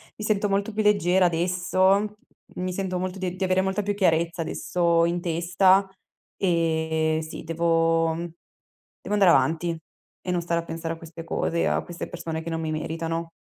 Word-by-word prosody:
Mi 215 - -6
sento 210 -1 +1
molto 200 +2 0
più 215 - 0
leggera 190 -3 +3
adesso, 185 +4 +2 0.4
mi 185 0 -3
sento 185 -1 -2
molto 185 +1 -4
di 185 -1 -3
di 185 - -3
avere 185 0 +2
molta 190 +2 -1
più 205 +1 -1
chiarezza 170 -3 +1
adesso 170 0 +1
in 170 +1 -1
testa, 180 +3 +3 0.5
ehm, 160 -3 +1
sì, 160 0 -7
devo 165 0 +2
mhmm, 170 - -4 0.8
devo - - -4
andare 195 -4 +6
avanti 165 +5 +2 0.5
e - - +1
non 175 -1 0
stare 170 0 -1
a - - -14
pensare 165 0 -4
a - - -15
queste 165 0 -10
cose 170 0 -1
e - - +2
a - - 0
queste 175 0 -7
persone 165 -2 -5
che 165 - -6
non 165 0 -2
mi 160 -1 -2
meritano. 165 +1 -3
170 Hz, 185 wpm, -25 LUFS, 165-185 Hz, 0.8 s, andare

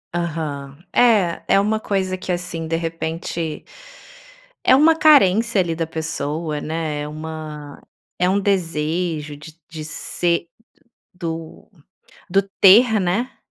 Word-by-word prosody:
Aham. 150 -5 -4 0.2
É, 210 -8 +3
é - - +4
uma 215 +2 +1
coisa 190 -3 -1
que 185 - -5
assim, 175 -2 -4
de 165 - -1
repente 165 -1 -4 1.0
é 260 - +6
uma 315 +4 +5
carência 230 - +5
ali 170 -2 -2
da 165 0 -2
pessoa, 155 -1 -3
né, 155 -2 -3
uma 155 -1 -8 0.4
é 180 +1 +3
um 195 +2 +2
desejo 165 -4 -1
de 150 +2 -12
t 165 - -39
de 160 -2 -7
ser 170 +2 -1 0.7
do 165 -2 -7 0.6
do 195 +2 +4
do 195 - -22
ter, 220 +3 +7
né? 195 +8 -1
170 Hz, 130 wpm, -21 LUFS, 155-195 Hz, 1.0 s, ter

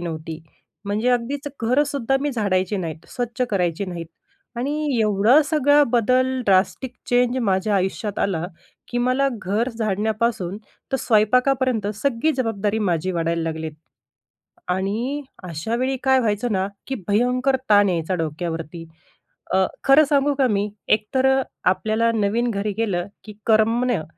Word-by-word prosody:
नव्हती. 160 -2 -5 0.5
म्हणजे 210 +4 0
अगदीच 255 +4 -1 0.2
घर 255 +6 +3
सुद्धा 270 -2 0
मी 290 +1 -1
झाडायचे 200 -4 0
नाहीत 165 -3 -5
स्वच्छ 245 0 -3
करायचे 180 -1 0
नाहीत 170 -2 -6 0.5
आणि 265 +4 -1 0.3
एवढा 215 +6 +4
सगळा 295 -1 +4
बदल 255 +2 +2
ड्रास्टिक 200 +6 +2 0.2
चेंज 245 0 +2
माझ्या 200 0 +1
आयुष्यात 195 +2 -2
आला, 175 -4 0 0.4
की 245 - -2
मला 255 +3 +2
घर 210 +6 0
झाडण्यापासून 215 -2 -1 0.4
तर - - +3
स्वयंपाकापर्यंत 250 +1 +2
सगळी 270 +6 0
जबाबदारी 220 -4 -1
माझी 185 -3 0
वाढायला 165 0 -1
लागली. 160 -1 -3 1.0
आणि 215 +10 -1 0.3
अशा 170 +8 -3
वेळी 260 +2 0
काय 265 0 +4
व्हायचं 220 0 0
ना, 190 -1 0 0.2
की 270 - -3
भयंकर 250 +5 +2
ताण 205 -1 +6
यायचा 170 0 -1
डोक्यावरती. 165 0 -4 0.7
अ, 190 0 +4 0.2
खरं 275 +3 +7
सांगू 285 0 +3
का 265 - +4
मी 205 -2 0 0.2
एकतर 220 +5 +1
अ, - - 0 0.3
आपल्याला 220 +4 +1
नवीन 225 +3 +1
घरी 205 0 -2
गेलं, 195 -6 -1 0.2
की 215 - -10
करमणं 225 -2 +2
215 Hz, 135 wpm, -22 LUFS, 190-250 Hz, 1.0 s, खरं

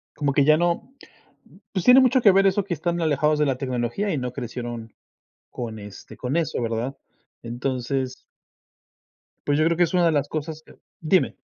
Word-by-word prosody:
Como 145 -2 0
que 140 0 +3
ya 155 +1 +5
no 175 +9 -1 0.8
pues, 185 -3 -2
tiene 250 +1 +8
mucho 255 0 +4
que 210 - +7
ver 195 +1 +4
eso 195 +1 +1
que 190 -2 -3
están 170 +2 -2
alejados 150 -1 +1
de 150 - +3
la 135 -3 0
tecnología 130 - -2
y 155 - -1
no 125 -2 -3
crecieron 120 -3 -6 0.6
con, 115 -3 -6
este, 105 -1 -11
con 130 +3 -3
eso, 165 -6 -1
¿verdad? 115 +3 -3 0.4
Entonces 130 +2 -3 1.3
pues, 145 0 +2
yo 155 - +3
creo 165 0 +1
que 175 - +5
es 170 - -1
una 180 -1 +3
de 165 - +4
las 145 -2 0
cosas 155 0 -5
que - - -17 0.3
Dime. 175 +3 +2
145 Hz, 190 wpm, -24 LUFS, 125-170 Hz, 1.3 s, tiene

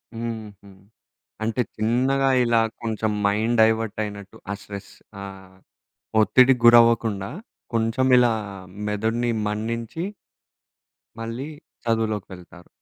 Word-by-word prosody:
హుహు. 110 -3 -6 0.7
అంటే 115 +3 0
చిన్నగా 130 +5 +2
ఇలా 120 -1 +3 0.2
కొంచెం 110 -1 -1
మైండ్ 110 +4 +1
డైవర్ట్ 110 -1 +2
అయినట్టు 100 -1 -8
ఆ - - 0
స్ట్రెస్ 100 0 -9 0.3
ఆహ్, 95 -1 -11 0.6
ఒత్తిడి 130 +4 +6
గురవ్వకుండా 115 -4 +5 0.4
కొంచెం 115 +3 +1
ఇలా 120 -2 +5 0.6
మెదడిని 110 +3 0 0.2
మన్నించి 115 +8 -3 1.2
మళ్ళీ 115 +5 -5 0.4
చదువులోకి 110 -3 0
వెళ్తారు. 90 -1 -14
115 Hz, 95 wpm, -24 LUFS, 105-120 Hz, 1.2 s, ఒత్తిడి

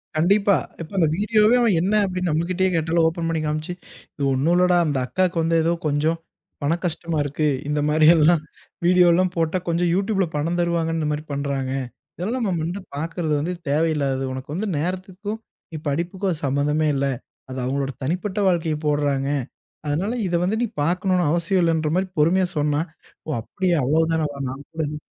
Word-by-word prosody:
கண்டிப்பா. 200 +5 +4 0.3
இப்போ 165 +4 -8
அந்த 165 -4 +4
வீடியோவே 215 +2 +4
அவன், 225 -6 +3
"என்ன?" 190 +4 +1
அப்படின்னு 185 -2 -2
நம்ம 160 +2 +1
கிட்டயே 185 +1 +1
கேட்டாலும், 165 +1 +2
ஓப்பன் 165 0 -2
பண்ணி 165 -1 -1
காமிச்சு, 155 +3 -2 0.4
"இது 145 - -4
ஒண்ணும் 140 +6 +2
இல்லடா, 180 0 +4
அந்த 145 -3 0
அக்காக்கு 180 +6 0
வந்து 165 +1 +1
ஏதோ 165 +1 +2
கொஞ்சம் 150 +3 +1 0.5
பண 150 +4 +2
கஷ்டமா 165 -1 -2
இருக்கு. 145 +2 -1 0.2
இந்த 150 0 0
மாரியெல்லாம் 155 +1 +5 0.4
வீடியோல்லாம் 180 0 +4
போட்டா 165 +1 +1
கொஞ்சம் 170 +1 +1
YouTubeல 195 0 +1
பணம் 165 +4 -1
தருவாங்கன்னு 165 -1 0
இந்த 150 -1 -1
மாரி 150 0 -3
பண்றாங்க. 140 -2 -2 0.5
இதெல்லாம் 230 +7 -2
நம்ம 180 -3 0
வந்து 175 +4 -3 0.2
பாக்கிறது 160 +1 -2
வந்து 170 +5 -2 0.2
தேவையில்லாதது. 145 -3 +1
உனக்கு 130 +1 -7
வந்து 210 +5 -2
நேரத்துக்கும், 185 +6 -4 0.3
நீ 160 - -5
படிப்புக்கும் 175 +6 -2
அது 160 -2 -5
சம்மந்தமே 145 +3 +1
இல்ல. 140 0 0 0.4
அது 130 0 -5
அவுங்களோட 135 +1 -1
தனிப்பட்ட 185 +8 -2
வாழ்க்கைய 165 -3 0
போடுறாங்க" 145 -2 +1 0.6
அதனால, 175 +10 0
இத 175 - -1
வந்து 190 +4 +1
நீ - - +3 0.2
பாக்கனுன்னு 180 +3 +1
அவசியமில்லன்ற 165 -2 +1
மாரி 185 +1 +1
பொறுமையா 180 +5 +3
சொன்னா, 145 0 +1 0.5
ஓ! - - -5
அப்படியா 180 - -1
அவ்வளோ 150 +6 +3
தானா 160 -1 +1 0.2
நான் 135 +2 -7
கூடா 160 -1 -3
எது 150 +1 -5
165 Hz, 165 wpm, -23 LUFS, 150-180 Hz, 0.6 s, மாரியெல்லாம்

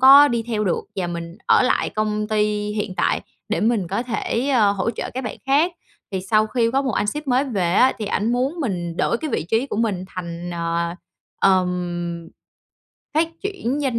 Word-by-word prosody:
có 275 +2 +9
đi 235 -1 0
theo 220 -2 -1
được, 180 - +1 0.2
và 180 -2 -1
mình 170 +1 -6
ở - - +5
lại 250 - +1
công 215 0 -1
ty 215 -1 +2 0.3
hiện 205 -3 -3
tại - - +1 0.3
để - - 0
mình 215 -5 +1
có 200 +6 -1
thể, 240 +2 -1
ơ, 215 -7 +4
hỗ 200 +3 -1
trợ 215 - -5
các 260 -1 -3
bạn - - -4
khác. 300 +6 +3 0.4
Thì 190 - -1
sau 215 +2 +3
khi 230 0 +1
có 270 +2 +1
một 260 -4 -1
anh 205 - 0
sếp 300 +7 -3
mới 255 +2 +3
về 195 -10 0
á, 260 - +5
thì 215 - -3
ảnh 215 +3 0
muốn 260 +6 0
mình 175 - -2
đổi 235 - +1
cái 310 -3 -4
vị - - 0
trí 225 +9 +1
của 240 - -4
mình 205 -5 0
thành, 175 -1 -6
ờ, 170 0 -1 0.5
ừm, 175 -3 +1 0.9
phát 320 +1 +3
triển 295 - -2
doanh 255 -5 0
215 Hz, 205 wpm, -22 LUFS, 180-255 Hz, 0.9 s, có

